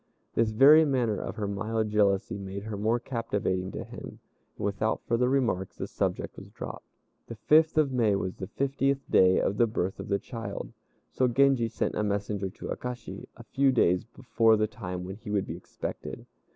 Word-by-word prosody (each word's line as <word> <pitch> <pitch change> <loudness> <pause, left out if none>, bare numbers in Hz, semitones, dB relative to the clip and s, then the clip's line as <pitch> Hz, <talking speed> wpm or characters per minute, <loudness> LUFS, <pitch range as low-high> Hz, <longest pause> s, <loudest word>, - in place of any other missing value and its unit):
This 115 -1 +2
very 140 +8 +7
manner 125 -8 0
of - - -5
her 105 -3 -3
mild 110 +2 -1
jealousy 100 0 +2
made 100 0 -6
her 110 -1 -5
more 110 +4 +1
captivating 105 -7 -2
to - - -4
him, - - -9 0.4
and - - -3
without 105 +2 -1
further 125 +1 +2
remarks 120 -9 0
the - - -4
subject - - -3
was - - -12
dropped. - - -8 0.4
The 115 - -7
fifth 155 +7 +4
of 150 -3 +3
May 115 -5 +2
was 95 -1 -2
the 95 - -5
fiftieth 140 +2 0
day 95 0 +5
of 100 - 0
the 120 - +4
birth 95 -3 -2
of - - -6
the 100 - +1
child, 115 +1 -6 0.4
so 130 - +2
Genji 130 -1 +3
sent 115 - -2
a - - -1
messenger 100 -1 -1
to 95 - -9
Akashi 125 0 -6
a - - -10
few 135 0 +2
days 90 -8 +3
before 115 -2 +2
the 110 - +2
time 90 -4 -6
when 95 +2 -7
he 110 - -10
would 100 -2 0
be 80 - -5
expected. 85 - -7
110 Hz, 190 wpm, -28 LUFS, 100-125 Hz, 0.4 s, very